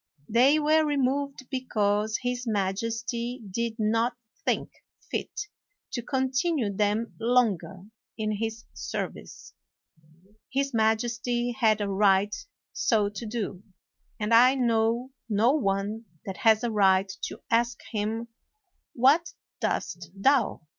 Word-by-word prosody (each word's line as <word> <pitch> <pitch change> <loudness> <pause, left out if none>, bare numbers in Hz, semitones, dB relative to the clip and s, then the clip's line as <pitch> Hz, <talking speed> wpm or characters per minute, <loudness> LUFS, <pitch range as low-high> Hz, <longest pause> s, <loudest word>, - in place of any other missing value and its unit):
They 255 +7 +5
were 310 +1 +4
removed 280 -2 -1
because 215 -4 0
his 245 0 -2
majesty 230 +4 -2
did 230 +2 -2
not 230 +2 +1 0.3
think - - 0 0.4
fit - - -2 0.6
to 240 - -3
continue 260 -1 0
them 210 +3 0
longer 205 -7 +1 0.3
in 215 -1 -1
his 225 +1 -4
service. 70 0 -6 1.0
His 275 0 0
majesty 230 +2 +1
had 220 -2 +2
a 205 - 0
right 200 0 +3 0.4
so 210 -4 +2
to 205 +2 -7
do; 210 -5 -4 0.6
and 215 +1 0
I 250 +3 +7
know 235 0 +1 0.2
no 220 +4 +4
one 210 -4 -1 0.2
that 190 -2 -5
has 225 -2 +4
a 240 - 0
right 195 -2 +3
to - - -8
ask 235 +1 +2
him, 225 +2 -2 0.6
"What 290 - +3 0.3
doest 175 -2 -2
thou?" 250 +3 +2
230 Hz, 115 wpm, -27 LUFS, 210-250 Hz, 1.0 s, I